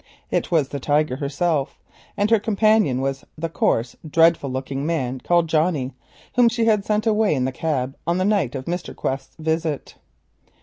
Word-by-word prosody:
It - - 0
was 155 -6 +2
the 140 - -4
Tiger 145 -1 +1
herself, 145 +1 -1 0.4
and 205 +2 +1
her 225 - +6
companion 215 - +2
was 135 0 -2
the 165 +1 -3
coarse, 120 -6 0
dreadful 165 -2 +3
looking 135 +1 -3
man 135 -5 -1
called 170 +4 +2
Johnnie, 155 -5 +1 0.4
whom 245 -2 +5
she 230 -1 0
had 215 -3 +3
sent 210 +1 0
away 215 -5 +3
in 130 -2 0
the 130 - -1
cab 135 -2 -2
on 170 +1 +1
the 185 - +1
night 195 - +1
of 130 -1 -5
Mr. 175 +2 -4
Quest's 135 0 -4
visit. 160 -2 -2
160 Hz, 175 wpm, -22 LUFS, 135-190 Hz, 0.4 s, her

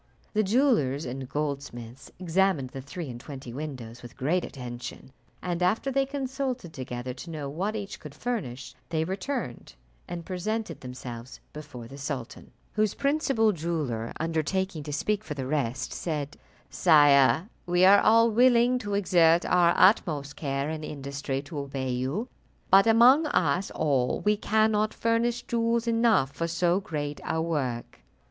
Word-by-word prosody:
The 215 - +3
jewellers 200 - +2
and 130 +1 -6
goldsmiths 135 -4 -5
examined 180 -6 +1
the 135 - -6
three 165 +4 -7
and 120 -2 -7
twenty 130 -4 -9
windows 125 -5 -7
with 120 - -12
great 155 +7 +1
attention, 125 0 -8 0.3
and 175 -1 -2
after 215 +9 +1
they 275 - +1
had - - -19
consulted 265 - -3
together, 125 -2 -5
to 135 +7 -10
know 150 -3 -5
what 185 +10 -2
each 205 -2 -6
could 150 -2 -11
furnish, 135 - -4 0.2
they 160 -1 0
returned, 190 - -4 0.3
and 170 -1 -6
presented 185 - -3
themselves 125 -1 -8
before 145 -6 -9
the 135 +3 -11
sultan, 135 -4 -6 0.2
whose 215 -1 +1
principal 275 -6 +2
jeweller 150 - -3
undertaking 165 +2 -1
to 150 - -5
speak 210 +8 -1
for 150 - -6
the 135 -2 -4
rest, 130 -3 -2
said, 150 -4 -3 0.4
"Sire, 140 - +5 0.2
we 175 +1 +4
are 200 +1 +7
all 230 +1 +5
willing 245 +1 +4
to 205 -3 -3
exert 175 -4 +4
our 175 -1 +4
utmost 155 -8 +3
care 140 -1 -2
and 155 0 -4
industry 140 -1 -4
to 150 0 -6
obey 135 -2 -3
you; 135 - -2 0.4
but 195 +3 +7
among 250 +7 +6
us 180 - +1
all 135 -5 0
we 210 0 +3
cannot 215 0 +1
furnish 235 +1 0
jewels 235 0 0
enough 230 - +3
for 165 +3 -3
so 175 +2 +1
great 150 -7 -4
a 160 - -1
work." 140 -8 -3
160 Hz, 155 wpm, -27 LUFS, 135-210 Hz, 0.4 s, are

